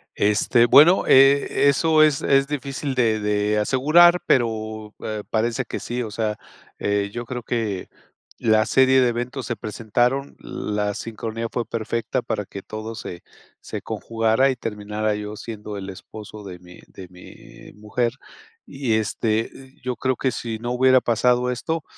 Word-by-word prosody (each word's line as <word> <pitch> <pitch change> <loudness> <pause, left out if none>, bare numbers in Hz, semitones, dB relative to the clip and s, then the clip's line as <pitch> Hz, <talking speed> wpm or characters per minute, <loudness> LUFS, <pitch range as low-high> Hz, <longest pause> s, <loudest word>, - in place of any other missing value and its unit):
Este. 105 +3 +3
Bueno, 150 +9 +7
eh, 135 +1 +5
eso 155 +2 +4
es 150 -3 +3
es, 135 0 +3
difícil 140 -1 -4
de 115 -3 +2
de, 105 0 0
asegurar, 155 +10 +5
pero, 110 -3 -1
eh, 110 -1 -4
parece 115 +3 0
que - - -5
sí. 120 +1 -4
O 110 - -6
sea, 105 0 -2 0.4
eh, 100 0 0
yo 120 0 -5
creo 125 0 -6
que, 110 -6 -3 0.5
la 110 -1 +3
serie 130 0 +4
de 125 - +3
eventos 125 +2 -4
se 120 - -2
presentaron. 120 +5 -1
La 105 -1 -3
sincronía 115 +1 -5
fue 120 - -2
perfecta, 115 +2 -2
para 105 -3 -3
que 100 - -9
todo 110 +3 -7
se 90 -4 -8 0.4
se, - - -7
conjugara 115 +3 +1
y 130 - -1
terminara, 105 -2 -3
yo 105 0 -6
siendo 105 -1 -7
el 95 0 -7
esposo 105 +2 -10
de 90 -2 -8
mí 90 0 -15
de 95 - -11
mí 90 0 -15
mujer. 110 +3 -2 0.5
Y, 135 -5 -2
este, 110 +1 -1 0.3
yo 125 -1 -2
creo 130 +2 0
que 130 - -1
sí 115 -2 -4
no 120 +2 -4
hubiera 130 +1 +4
pasado 125 +2 +2
esto, 160 +6 -3
115 Hz, 160 wpm, -22 LUFS, 105-130 Hz, 0.5 s, Bueno